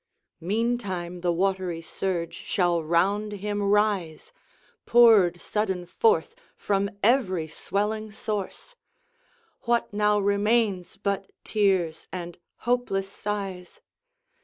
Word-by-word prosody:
Meantime, 190 -3 -2
the 175 0 +1
watery 185 -1 0
surge 170 0 -3
shall 175 -4 0
round 195 +6 +1
him 205 +1 -3
rise, 200 - 0 0.5
Poured 215 -8 +6
sudden 190 -2 -2
forth 450 - +2 0.2
from 200 0 0
every 200 -9 +2
swelling 210 +6 -3
source. 210 - -5 0.9
What 235 -3 +1
now 210 0 +3
remains 200 -2 +1
but 200 -1 -2
tears 190 -6 +1
and 175 -1 -6 0.3
hopeless 235 -6 0
sighs? 195 -3 -5
200 Hz, 95 wpm, -26 LUFS, 180-210 Hz, 0.9 s, Poured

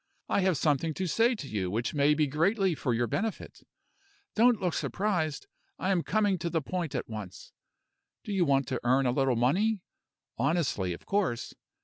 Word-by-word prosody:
I - - +1
have 185 -4 +2
something 150 +2 +1
to 190 - -2
say 230 +8 +2
to 150 -10 -7
you 100 -6 -2
which 115 +5 -2
may 145 0 +3
be 155 0 +2
greatly 185 +7 +1
for 145 -4 -2
your 120 +1 +1
benefit. 210 - -4 0.7
Don't 235 +1 +4
look 180 -3 -1
surprised; 175 -7 -1 0.3
I 190 - -1
am 180 -3 +2
coming 205 -1 +1
to 170 - -2
the 165 0 0
point 170 0 -4
at - - -3
once. 105 -5 -8 0.7
Do 210 - -4
you 190 -2 +3
want 140 -3 +2
to 130 - -1
earn 130 +3 +3
a 125 - +3
little 135 -1 +1
money? 185 - +1 0.6
honestly, 135 - 0
of - - -11
course. 190 - -1
155 Hz, 185 wpm, -29 LUFS, 130-190 Hz, 0.7 s, Don't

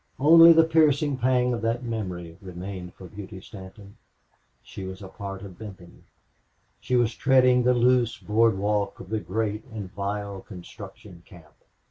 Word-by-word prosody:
Only 165 +4 +8
the 165 0 +6
piercing 150 -3 +2
pang 125 0 +2
of 115 - -3
that 115 +2 -1
memory 90 -8 -5
remained 90 -1 -8
with 95 -2 -12
Beauty 100 -1 -8
Stanton. 100 +2 -13 0.7
She 95 - -9
was 95 +1 -8
a - - -8
part 95 0 -8
of 95 -3 -11
Benton. 95 -5 -12 0.7
She 125 - -2
was 120 -2 +2
treading 130 -1 +4
the 125 +1 +3
loose 120 -1 +2
board 110 0 +2
walk 100 0 -1
of 95 - -11
the 110 0 -1
great 105 +3 -3
and 110 -7 -8
vile 100 0 -4
construction 90 -2 -12
camp. 80 -5 -17
105 Hz, 155 wpm, -25 LUFS, 95-125 Hz, 0.7 s, Only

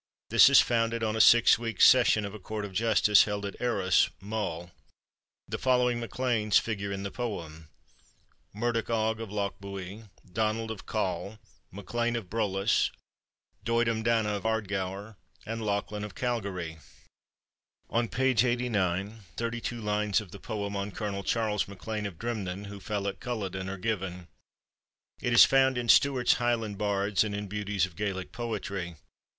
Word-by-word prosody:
This - - +8
is - - +8
founded 115 -1 0
on 110 0 0
a 110 - +3
six 115 0 +7
weeks' 115 -4 +4
session 120 -4 +5
of 100 - -6
a 110 - -8
court 105 +2 -5
of 100 - -9
justice 105 -1 +4
held 105 -1 -3
at 100 - -7
Arcs, 100 -7 +2
Mull. 95 -5 -4 0.8
The - - -4
following 125 -2 +2
MacLeans 115 -2 +1
figure 100 -3 -4
in 100 0 -4
the 100 - -4
poem: 85 -10 -5 0.8
Murdoch 115 +2 -2
Og 110 -1 0
of 115 - -6
Lochbuie, 100 0 -5 0.2
Donald 110 +2 -1
of 110 - -9
Coll, 100 -1 -2 0.3
MacLean 120 +5 -2
of 110 -6 -5
Brolass, 105 -2 +1 0.7
Doidim 115 -1 +1
Dana 115 -2 +1
of 100 -1 -3
Ardgour, 100 -1 -3 0.3
and 115 0 -4
Lachlan 105 0 -2
of 105 -3 -7
Calgary. 95 -10 -3 1.1
On 115 0 +1
page 130 -2 +2
89, 110 -5 -1 0.2
thirty 115 0 -3
two 120 +1 -4
lines 105 -1 +1
of 105 -5 -10
the 100 - -10
poem 100 -3 -4
on 100 +1 -2
Colonel 100 -1 -4
Charles 105 -2 0
MacLean 105 +2 -5
of 90 -5 -10
Drimnin 100 -4 -4
(who 100 0 -8
fell 100 0 -3
at 100 - -4
Culloden) 95 -6 -4
are 100 - -5
given. 90 -4 -3 0.9
It 120 - -1
is 120 - +9
found 130 -1 +3
in 120 -1 -3
Stewart's 135 -3 +5
Highland 115 -4 -1
Bards 100 0 +1
and 105 -2 -3
in 105 0 -4
Beauties 105 -1 -1
of 90 -3 -12
Gaelic 95 -2 -3
Poetry. 100 -7 -4
105 Hz, 155 wpm, -29 LUFS, 100-115 Hz, 1.1 s, is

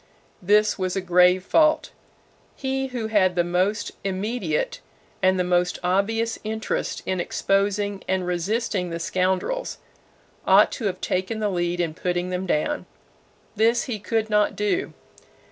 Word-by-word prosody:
This 210 +2 +3
was 185 -1 -1
a - - +1
grave 180 0 +4
fault. 310 +9 +3 0.6
He 270 0 -2
who 245 -3 -4
had 200 -5 +2
the 175 - +3
most 185 +5 0
immediate 235 - -2 0.4
and 185 0 +3
the - - +3
most 180 0 +1
obvious 220 +5 0
interest 220 0 -3
in 185 -1 -1
exposing 200 +2 0
and 185 -1 0
resisting 180 +2 -1
the 170 - -3
scoundrels, 185 - -1 0.7
ought - - +6
to 230 - -5
have 195 - -2
taken 185 +4 -1
the 215 -1 0
lead 175 -1 -1
in 165 -3 0
putting 175 +2 -2
them 180 +1 -3
down. 175 - -1 0.7
This 230 +3 +3
he 235 -5 -4
could 220 +2 -1
not 210 -1 +2
do. 210 - -1
195 Hz, 145 wpm, -24 LUFS, 180-220 Hz, 0.7 s, ought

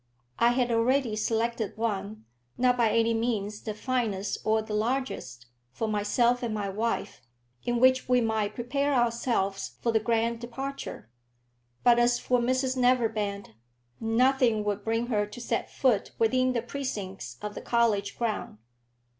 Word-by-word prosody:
I 235 - +5
had 245 -1 +1
already 235 0 +2
selected 225 0 -1
one, 215 -1 -3 0.3
not 250 0 +3
by 235 -2 +3
any 230 +1 +2
means 215 -3 -1
the 215 -2 -5
finest 215 -4 -1
or 220 0 +2
the 215 0 -6
largest, 220 - -2 0.3
for 225 - -3
myself 220 +4 +2
and 240 -2 -2
my 205 -2 -2
wife, 225 +4 -2 0.4
in 240 0 0
which 260 0 +4
we 250 0 +5
might 220 -3 0
prepare 280 +4 0
ourselves 230 -5 0
for 235 - 0
the 220 - +3
grand 230 +1 0
departure. 265 - -6 0.7
But 240 -1 +6
as 240 0 +4
for 250 0 +1
Mrs 255 +2 +1
Neverbend, 225 - +1 0.5
nothing 235 0 +2
would 205 -1 -2
bring 225 +1 0
her 210 -4 0
to 210 +3 -10
set 240 - -2
foot 245 -7 +1
within 255 +3 +2
the 235 -2 -1
precincts 220 -8 -5
of 210 0 -5
the - - -7
college 220 -4 +1
ground. 225 - -2
230 Hz, 150 wpm, -28 LUFS, 215-245 Hz, 0.7 s, But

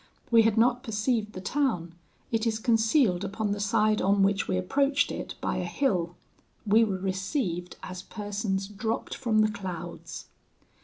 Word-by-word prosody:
We 230 -1 +7
had 225 -1 +2
not 245 +2 +4
perceived 220 -1 -1
the 185 - -7
town: 185 - -1 0.4
it 225 0 +1
is 220 -1 0
concealed 225 - +2
upon 200 +1 -2
the 205 - -2
side 215 0 +2
on 195 +1 +3
which 195 0 +1
we 185 - 0
approached 275 +10 +1
it - - -5
by - - -1
a - - -1
hill. 180 -11 0 0.5
We 220 +2 +5
were 200 -4 0
received 190 - -2
as 185 0 -6
persons 205 -1 -3
dropped 220 +2 -3
from 225 -4 +1
the 215 0 +3
clouds. 180 -5 -7
210 Hz, 160 wpm, -28 LUFS, 190-225 Hz, 0.5 s, We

